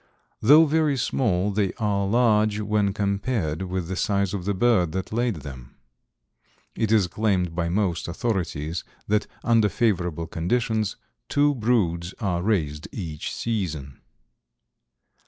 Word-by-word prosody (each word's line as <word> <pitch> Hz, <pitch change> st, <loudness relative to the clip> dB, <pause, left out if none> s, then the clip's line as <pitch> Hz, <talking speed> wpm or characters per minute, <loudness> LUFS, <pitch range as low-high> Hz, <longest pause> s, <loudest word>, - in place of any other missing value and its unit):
Though 150 Hz, +8 st, +7 dB
very 155 Hz, -2 st, +2 dB
small 105 Hz, -6 st, 0 dB
they 100 Hz, -1 st, 0 dB
are 100 Hz, -3 st, 0 dB
large 110 Hz, -2 st, +3 dB
when 105 Hz, -1 st, +1 dB
compared 100 Hz, -4 st, -1 dB
with 90 Hz, -2 st, -3 dB
the 95 Hz, -, -3 dB
size 100 Hz, 0 st, 0 dB
of 95 Hz, -3 st, -4 dB
the 100 Hz, 0 st, 0 dB
bird 95 Hz, -7 st, +2 dB
that 95 Hz, +2 st, -4 dB
laid 120 Hz, -1 st, 0 dB
them. 65 Hz, -3 st, -10 dB, 1.0 s
It 110 Hz, -2 st, 0 dB
is 110 Hz, -4 st, +4 dB
claimed 90 Hz, -2 st, 0 dB
by 85 Hz, 0 st, -1 dB
most 90 Hz, -2 st, 0 dB
authorities 85 Hz, -5 st, -2 dB, 0.2 s
that 105 Hz, 0 st, +1 dB, 0.2 s
under 115 Hz, -3 st, +3 dB
favorable 90 Hz, -9 st, 0 dB
conditions 110 Hz, +6 st, -1 dB, 0.3 s
two 145 Hz, 0 st, +3 dB
broods 100 Hz, -8 st, 0 dB
are 90 Hz, -5 st, -1 dB
raised 80 Hz, -8 st, -1 dB
each 80 Hz, -7 st, -5 dB
season. 80 Hz, -, -3 dB
100 Hz, 130 wpm, -24 LUFS, 85-110 Hz, 1.0 s, Though